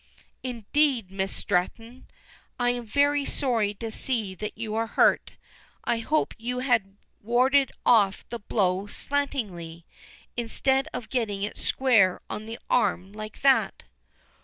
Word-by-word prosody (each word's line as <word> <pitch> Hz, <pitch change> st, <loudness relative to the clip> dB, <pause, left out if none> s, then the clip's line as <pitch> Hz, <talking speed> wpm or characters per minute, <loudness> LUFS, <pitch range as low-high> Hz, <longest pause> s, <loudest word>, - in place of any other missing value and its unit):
"Indeed, 250 Hz, -2 st, 0 dB
Miss 195 Hz, 0 st, -2 dB
Stretton, 225 Hz, +6 st, -1 dB, 0.5 s
I 245 Hz, 0 st, +3 dB
am 245 Hz, -2 st, -5 dB
very 285 Hz, +4 st, +2 dB
sorry 230 Hz, -8 st, 0 dB
to 225 Hz, +2 st, -5 dB
see 220 Hz, -5 st, -1 dB
that 210 Hz, +3 st, -6 dB
you 220 Hz, -1 st, -4 dB
are 225 Hz, +1 st, 0 dB
hurt. -, -, +2 dB, 0.5 s
I 235 Hz, -, 0 dB
hoped 305 Hz, +7 st, 0 dB
you 245 Hz, +2 st, -3 dB
had 230 Hz, -7 st, 0 dB, 0.2 s
warded 260 Hz, +5 st, +3 dB
off 205 Hz, -5 st, +4 dB
the 235 Hz, -, -5 dB
blow 195 Hz, -2 st, 0 dB
slantingly, 205 Hz, -, -2 dB, 0.5 s
instead 265 Hz, +4 st, +1 dB
of 230 Hz, -, -6 dB
getting 210 Hz, -6 st, -1 dB
it 205 Hz, -, -4 dB
square 225 Hz, -9 st, +3 dB
on 215 Hz, +1 st, -5 dB
the 225 Hz, +1 st, -6 dB
arm 195 Hz, -4 st, +1 dB
like 215 Hz, 0 st, -8 dB
that." 270 Hz, -1 st, +3 dB
225 Hz, 135 wpm, -26 LUFS, 205-255 Hz, 0.5 s, off